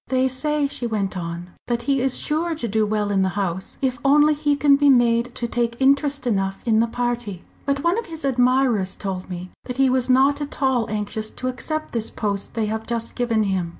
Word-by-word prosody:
"They 260 0 +2
say," 290 +3 0
she 245 -3 -4
went 205 -4 -2
on, 170 0 -5 0.2
"that 235 -1 -1
he 275 0 +1
is 265 0 +1
sure 325 +2 -1
to 270 -6 -4
do 215 0 +1
well 210 -1 0
in 195 -1 +2
the 190 - +2
House, 190 -2 -3
if 255 -2 0
only 295 +2 +5
he 295 -1 +1
can 285 0 +5
be 285 0 +4
made 240 -1 +3
to 240 - -2
take 235 0 -2
interest 280 +1 +2
enough 195 -4 -1
in 220 -2 +3
the 230 - +3
party. 240 -6 -3 0.2
But 280 0 0
one 345 +6 +2
of 465 - -7
his 320 -3 -6
admirers 250 -6 +2
told 190 -2 -5
me 180 0 -7
that 250 -1 -5
he 270 -1 +4
was 255 0 +1
not 270 +3 +4
at 290 - -5
all 265 -4 +1
anxious 215 +1 -3
to 255 - -5
accept 310 +5 -4
this 230 -2 -1
post 200 -1 -2
they 225 -2 0
have 220 +1 -4
just 230 -1 -1
given 230 -3 +1
him. 190 -4 -1
240 Hz, 220 wpm, -22 LUFS, 210-275 Hz, 0.2 s, only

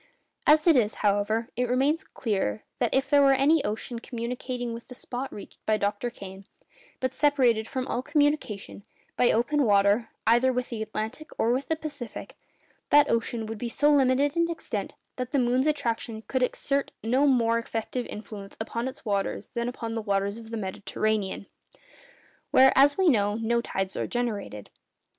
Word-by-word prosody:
As 305 +1 +6
it 335 -3 +6
is, 220 -4 +2
however, 205 +3 +1
it 250 0 -1
remains 280 +8 +2
clear, 195 - -2 0.2
that 240 -3 +1
if 265 +1 +1
there 285 -1 +5
were 275 -1 +6
any 280 +3 +3
ocean 225 +3 -4
communicating 245 +1 -4
with 230 0 -9
the 250 - -10
spot 255 +2 -5
reached 205 - -11
by 215 0 +3
Dr. 205 +3 -1
Kane, 195 -3 -11 0.5
but 260 -1 -1
separated 255 -7 +2
from 260 -2 -3
all 245 - -1
communication—by 255 -5 -1
open 285 +6 +1
water—either 225 +4 +3
with 250 0 -2
the 230 -3 -4
Atlantic 220 +7 -5
or 230 - +2
with 260 +3 -1
the 320 - +1
Pacific, 290 -7 -7 0.5
that 290 0 +5
ocean 230 0 -1
would 220 0 -6
be 240 - -3
so 295 +5 +3
limited 275 +1 +3
in 335 0 +2
extent 335 - -4 0.2
that 250 +1 -4
the - - +3
moon's 255 +2 +2
attraction 230 -6 -2
could 260 +2 -2
exert 275 +2 0
no 255 +6 +3
more 230 -3 +3
effective 230 +2 -4
influence 210 -2 -9
upon 230 +2 -3
its 265 +1 -8
waters 200 -2 -2
than 235 0 -2
upon 230 -2 -5
the 225 - -2
waters 200 +1 -1
of 225 -1 -12
the 230 - -4
Mediterranean—where, 200 0 -2 1.3
as 285 +1 +5
we 380 -1 +3
know, 205 -8 +3
no 230 +1 0
tides 195 -4 -3
are - - -2
generated. 210 - -4
235 Hz, 165 wpm, -27 LUFS, 220-270 Hz, 1.3 s, As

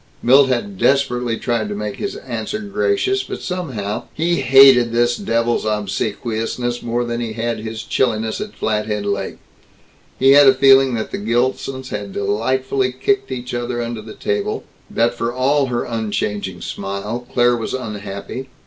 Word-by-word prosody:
Milt 135 +3 +6
had 190 +10 -2
desperately 125 -4 +1
tried 120 -3 -1
to 105 - -3
make 105 0 -4
his 200 - -4
answer 120 - -4
gracious 385 - 0
but - - -6
somehow 130 - -4
He 170 +2 +1
hated 135 -2 +7
this 120 +1 +2
devil's 115 - 0
obsequiousness 110 +3 -2
more 120 +1 -1
than 120 0 -3
he 115 -2 -3
had 115 0 -2
his 110 0 -6
chilliness 110 -3 0
at 210 0 -6
Flathead 105 -1 -1
Lake. 100 -1 -2 0.8
He 135 +1 +5
had 140 0 +8
a 135 - +7
feeling 135 -1 +5
that 110 - -4
the - - -3
Gilsons 130 +4 -1
had 100 -1 -5
delightedly 130 +6 0
kicked 135 +7 0
each 125 -1 -5
other 120 0 -2
under 120 -1 -4
the 110 0 -10
table; 430 0 -2 0.3
that, 120 +1 +1
for 120 0 -2
all 135 +3 +2
her 120 -1 -1
unchanging 105 -5 -3
smile, 100 +7 -5
Claire 120 0 +3
was 115 +1 -3
unhappy.... 105 +2 -6
120 Hz, 160 wpm, -19 LUFS, 110-135 Hz, 0.8 s, had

